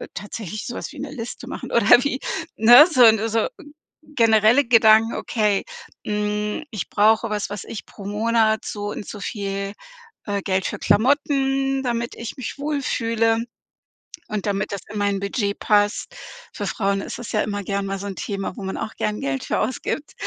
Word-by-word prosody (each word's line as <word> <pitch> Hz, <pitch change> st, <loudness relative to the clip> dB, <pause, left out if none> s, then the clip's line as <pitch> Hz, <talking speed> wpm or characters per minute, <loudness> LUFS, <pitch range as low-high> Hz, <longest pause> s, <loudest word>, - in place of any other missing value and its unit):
tatsächlich 205 Hz, +1 st, -6 dB
sowas 240 Hz, -, -6 dB
wie -, -, -13 dB
'ne 285 Hz, 0 st, -5 dB
Liste 235 Hz, -3 st, -7 dB
machen -, -, -7 dB
oder 245 Hz, -, +6 dB
wie, 280 Hz, -1 st, -1 dB, 0.4 s
ne, 240 Hz, +8 st, +9 dB
so 255 Hz, -5 st, +5 dB
'n 220 Hz, -1 st, +5 dB
so 225 Hz, +1 st, +1 dB, 0.6 s
generelle 230 Hz, -2 st, +4 dB
Gedanken, 225 Hz, -1 st, +5 dB
okay, 210 Hz, -4 st, 0 dB, 0.4 s
hm: 210 Hz, +2 st, -2 dB
„Ich 210 Hz, -6 st, -5 dB
brauche 220 Hz, +2 st, +3 dB
was, 210 Hz, -1 st, -2 dB
was 205 Hz, -2 st, -5 dB
ich 220 Hz, -, -8 dB
pro 200 Hz, -, -12 dB
Monat, 220 Hz, +1 st, +1 dB
so 205 Hz, 0 st, -4 dB
und 205 Hz, -, -7 dB
so 210 Hz, -, -7 dB
viel, 200 Hz, -1 st, -4 dB, 0.5 s
äh, 200 Hz, -1 st, -1 dB
Geld 190 Hz, -1 st, 0 dB
für -, -, -4 dB
Klamotten, 270 Hz, +2 st, +2 dB
damit 235 Hz, -1 st, -2 dB
ich 230 Hz, +3 st, -7 dB
mich 260 Hz, +2 st, -6 dB
wohlfühle 230 Hz, -6 st, 0 dB, 0.9 s
und 210 Hz, -2 st, -3 dB
damit 200 Hz, -1 st, -1 dB
das 200 Hz, -, -3 dB
in 210 Hz, -, -4 dB
mein 200 Hz, -1 st, 0 dB
Budget 200 Hz, +1 st, -2 dB
passt.“ 205 Hz, 0 st, +1 dB, 0.4 s
Für -, -, -4 dB
Frauen 195 Hz, -1 st, 0 dB
ist -, -, -7 dB
es 240 Hz, -, -7 dB
ja 210 Hz, -, +2 dB
immer 205 Hz, -1 st, -2 dB
gern 200 Hz, +1 st, -2 dB
mal 195 Hz, 0 st, -3 dB
so 200 Hz, -, -5 dB
'n 195 Hz, -, -5 dB
Thema, 195 Hz, -2 st, -4 dB
wo -, -, -6 dB
man 190 Hz, -, -4 dB
auch 220 Hz, -, -5 dB
gern 210 Hz, 0 st, -2 dB
Geld 135 Hz, -1 st, -2 dB
für -, -, -1 dB
ausgibt. 285 Hz, +3 st, -3 dB
215 Hz, 180 wpm, -22 LUFS, 205-235 Hz, 0.9 s, ne